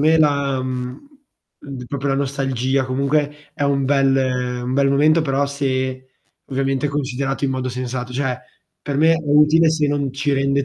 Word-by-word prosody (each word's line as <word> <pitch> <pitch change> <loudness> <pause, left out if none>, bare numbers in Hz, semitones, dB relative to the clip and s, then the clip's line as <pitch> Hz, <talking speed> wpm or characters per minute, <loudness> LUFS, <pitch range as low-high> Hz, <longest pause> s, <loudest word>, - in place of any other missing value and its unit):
me, 160 +2 +4
la, 140 -3 +2
mhmm, 125 - -5 0.6
l 140 - -7
d 125 - -7
proprio 140 +1 -3
la 135 - +1
nostalgia 135 -1 -1
comunque 145 +3 -1
è - - -4
un 140 -1 +1
bel 130 -3 +1
un 125 - -2
bel 140 +1 +3
momento, 150 +4 +4
però 140 -2 0
se 130 -2 -2 0.4
ovviamente 135 +1 -1
considerato 140 -1 -2
in 135 - +1
modo 130 -1 -2
sensato, 125 0 -4
cioè, 130 -1 -1 0.4
per 140 -2 -4
me 160 +3 +5
è - - +2
utile 150 +2 +4
se 155 -2 +1
non 145 -1 -1
ci 145 +1 0
rende 140 0 +1
135 Hz, 175 wpm, -20 LUFS, 130-145 Hz, 0.6 s, me